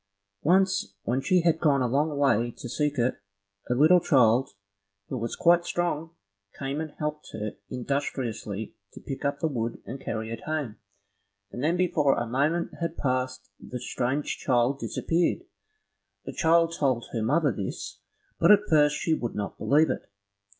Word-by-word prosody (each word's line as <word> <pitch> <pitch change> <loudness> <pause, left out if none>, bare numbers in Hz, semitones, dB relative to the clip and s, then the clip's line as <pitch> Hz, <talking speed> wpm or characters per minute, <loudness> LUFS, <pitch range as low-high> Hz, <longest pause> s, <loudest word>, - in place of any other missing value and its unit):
Once 190 - +2
when 125 +3 0
she 180 +5 +3
had 165 -1 +2
gone 140 -5 +3
a - - +1
long 145 +4 0
way 120 -5 +3
to 120 - -9
seek 150 +3 -1
it, 125 -1 0 0.5
a 125 - +2
little 155 +7 +6
child, 125 -4 +4 0.6
who 130 - -3
was 115 0 -3
quite 175 0 +4
strong, 170 -2 -2 0.4
came 140 +2 -3
and 155 -2 -6
helped 150 0 -4
her 105 -1 -3 0.2
industriously 120 -5 -3 0.2
to - - -10
pick 135 0 -6
up 140 0 0
the 160 - +1
wood 120 -5 -3
and 135 +3 -7
carry 110 -2 -4
it 115 - -5
home, 150 -8 -3 0.7
and 125 - -5
then 165 +4 +2
before 165 -6 +2
a 120 - -1
moment 145 +8 0
had 165 -1 -3
passed 130 -1 -2
the 125 - -7
strange 130 +4 -2
child 125 +1 +1
disappeared. 170 - 0 0.8
The - - -6
child 165 0 +3
told 130 -6 0
her 115 - -1
mother 145 +6 +2
this, 100 -1 -5 0.4
but 170 - +4
at 210 0 +7
first 150 -1 +5
she 160 - 0
would 120 -7 -3
not 100 -1 -4
believe 155 +3 +3
it. - - -6
140 Hz, 165 wpm, -27 LUFS, 120-160 Hz, 0.8 s, at